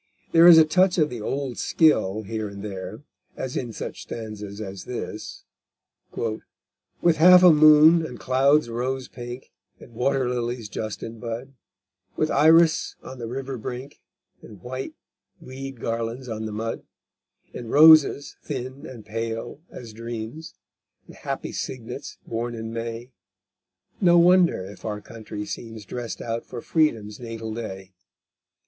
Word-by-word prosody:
There 165 +1 +7
is 170 -2 +10
a 160 - +8
touch 185 +3 +3
of 150 -4 +2
the 120 -3 -6
old 135 +2 -3
skill 110 - +2
here 110 +1 -4
and 100 0 -9
there, 100 +3 -7 0.3
as 130 -1 -5
in 120 -2 -3
such - - -7
stanzas 105 -2 -7
as 95 -3 -7
this: 115 -3 -7 0.7
_With 115 +8 -3
half 180 +3 +8
a 180 -3 +9
moon, 155 +2 +7
and 160 - -7
clouds 135 +3 +3
rose 125 +2 -3
pink, 120 +1 -9 0.3
And 120 - -15
water 130 +2 0
lilies 120 -2 -3
just 110 0 -5
in 115 0 -8
bud, 120 +3 -6 0.6
With - - 0
iris 160 +2 +4
on 130 - -9
the 115 - -5
river 135 +1 -5
brink, 125 +5 -7 0.4
And 105 - -13
white 130 +1 -6 0.4
weed 135 -1 -8
garlands 115 +3 -3
on 110 -1 -4
the - - -6
mud, 110 +2 -4 0.7
And 120 -2 -7
roses 155 -1 +6
thin 130 -1 -6
and 115 -5 -11
pale 115 +5 -5
as 115 -3 -10
dreams, 115 +6 -7 0.5
And - - -14
happy - - -5
cygnets 125 +2 -6
born 120 +1 -3
in 110 0 -6
May, 115 +2 -5 0.9
No 175 -2 +6
wonder 175 - +4
if 100 +2 -12
our 105 -1 -3
country 105 -1 -8
seems 115 -1 -7
Drest 120 +2 -6
out 115 0 -3
for 120 - -8
Freedom's 115 -8 0
natal 115 -2 -6
day_. 95 -4 -7
120 Hz, 145 wpm, -24 LUFS, 110-140 Hz, 0.9 s, is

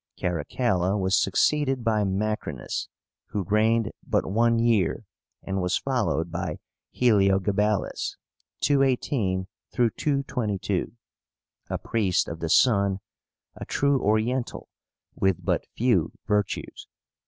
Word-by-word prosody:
Caracalla 90 - 0
was 95 -1 +1
succeeded 135 +5 +2
by 110 -2 +2
MACRÍNUS, 105 +2 -2 0.4
who 100 - -2
reigned 110 +3 +2
but - - 0
one 115 +3 +2
year, 115 -6 +1 0.4
and 95 0 -2
was 90 +2 +1
followed 110 -11 -1
by 85 -2 -3 0.4
HELIOGABALUS 105 -2 +1 0.4
(218 130 -8 +1 0.3
222), 120 - -1 0.8
a - - -1
priest 100 -6 0
of 85 - -6
the 80 - -3
sun, 100 -3 +4 0.6
a - - -7
true 140 -1 +1
Oriental, 110 +4 0 0.4
with 95 -3 0
but - - 0
few - - +2
virtues. 105 -1 -2
105 Hz, 100 wpm, -26 LUFS, 95-120 Hz, 0.8 s, sun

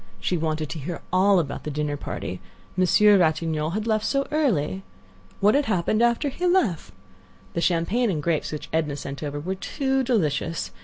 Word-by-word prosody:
She 180 - -1
wanted 155 -2 -1
to 160 - -5
hear 170 +5 -5
all 195 +2 +5
about 150 -5 -2
the - - -4
dinner 150 0 -2
party; 90 -9 -5 0.3
Monsieur 195 +3 +5
Ratignolle 160 -1 +1
had 215 0 -2
left 215 -2 +1
so 275 +3 0
early. 190 - +1 0.6
What 205 +2 +5
had 285 +1 +2
happened 215 +1 +1
after 240 +5 +2
he 355 +7 -2
left? 260 - +1 0.6
The 170 - -1
champagne 185 +8 +1
and 155 -6 -2
grapes 165 -2 0
which 150 - -6
Edna 155 -3 0
sent 140 -1 -7
over 145 -1 -4
were 180 +6 -3
too 265 +7 -1
delicious. 165 - 0
175 Hz, 175 wpm, -24 LUFS, 155-220 Hz, 0.6 s, all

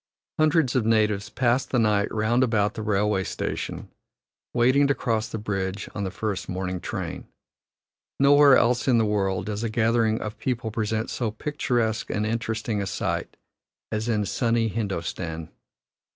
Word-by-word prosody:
Hundreds 155 -4 +3
of 125 - +3
natives 110 -2 +2
pass 125 +1 +1
the 130 - -2
night 105 -3 +2
round 110 +4 +2
about 110 -3 +1
the 110 - -5
railway 105 -2 +1
station, - - -4 0.6
waiting 130 +4 +4
to 140 - +2
cross 115 -3 -1
the - - -5
bridge 100 -2 -3
on 105 - -3
the 95 - -2
first 105 0 -4
morning 90 0 -3
train. - - -5 0.9
Nowhere 140 -1 +7
else 120 +2 +2
in 125 -3 +5
the 115 - +3
world 95 -3 0
does 105 +1 -3
a 115 - -1
gathering 115 0 +2
of 105 0 -6
people 120 -3 -2
present 110 0 -2
so 120 -3 -1
picturesque 120 -2 -1
and 105 +1 -1
interesting 110 -1 -2
a 100 - -3
sight - - -3 0.5
as 110 +2 -2
in 105 -3 +1
sunny 115 0 +1
Hindostan. 85 -6 -4
110 Hz, 155 wpm, -25 LUFS, 105-120 Hz, 0.9 s, Nowhere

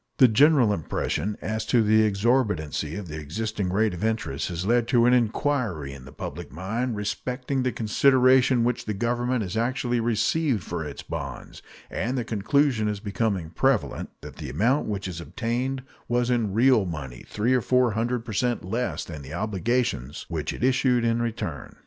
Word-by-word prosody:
The 130 - +8
general 130 -1 +5
impression 90 +3 -2
as 110 0 -2
to 120 -2 +4
the 110 +1 +4
exorbitancy 100 - +1
of 100 -3 -6
the 75 0 -6
existing 100 +5 -3
rate 105 +1 +2
of 90 +3 -5
interest 110 -11 -1
has 90 +1 -3
led 120 +2 +2
to 120 -2 +4
an 125 - +5
inquiry 115 - 0
in 65 -2 -11
the 65 - -11
public - - -7
mind 110 - -2
respecting 125 +6 -2
the 125 0 0
consideration 130 +2 +4
which 120 0 -1
the 105 - -2
Government 120 +2 0
has 95 0 -5
actually 120 +1 0
received 120 - +1
for 85 -2 -4
its 75 -2 -7
bonds, - - -6 0.3
and 125 +6 -2
the 120 - -1
conclusion 115 +2 +1
is 105 -1 -2
becoming 100 -5 -2
prevalent 135 +2 0
that 75 -1 -10
the 75 -4 -6
amount 115 - +1
which 100 -2 -3
it 85 -2 -5
obtained 125 +7 -2 0.2
was 120 +1 +1
in 115 -5 +1
real 125 -2 +5
money 70 -7 -6
three 115 +5 0
or 130 - +3
four 125 0 +3
hundred 115 +2 -1
per 110 - -6
cent 120 -1 0
less 115 +6 -2
than 75 -3 -8
the 70 +2 -8
obligations 105 - -1
which 80 -2 -2
it - - -6
issued 125 -2 +3
in 115 0 +1
return. 115 -1 -4
110 Hz, 180 wpm, -25 LUFS, 95-125 Hz, 0.3 s, The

